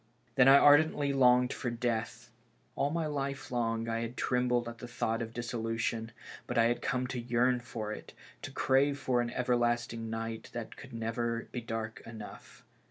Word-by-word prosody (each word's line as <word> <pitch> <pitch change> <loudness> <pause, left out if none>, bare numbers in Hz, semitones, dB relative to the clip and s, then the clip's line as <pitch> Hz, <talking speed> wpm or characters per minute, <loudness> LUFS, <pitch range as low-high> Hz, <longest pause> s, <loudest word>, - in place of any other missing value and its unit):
Then 125 +1 +5
I 135 +1 +9
ardently 145 0 +5
longed 125 -1 +4
for 120 - -3
death. 115 -1 -3 0.4
All 140 - +1
my 165 +1 -1
life 140 -3 -3
long 115 -2 -1
I 115 0 -1
had 115 +2 -5
trembled 125 -1 +1
at 115 0 -7
the 120 - -7
thought 115 0 -1
of 115 -1 -4
dissolution, 115 -1 -2 0.4
but - - -3
I 115 - +6
had 120 +1 +1
come 125 0 0
to 125 0 -4
yearn 120 +1 +2
for 115 -3 -5
it, 110 - -8 0.3
to - - -6
crave 140 +2 +2
for 125 -3 +1
an 120 - -2
everlasting 120 -2 0
night 115 0 -4
that - - -6
could - - -12
never 115 +1 -2
be 125 - -4
dark 115 -1 -4
enough. 115 -2 -11
120 Hz, 175 wpm, -31 LUFS, 115-125 Hz, 0.4 s, I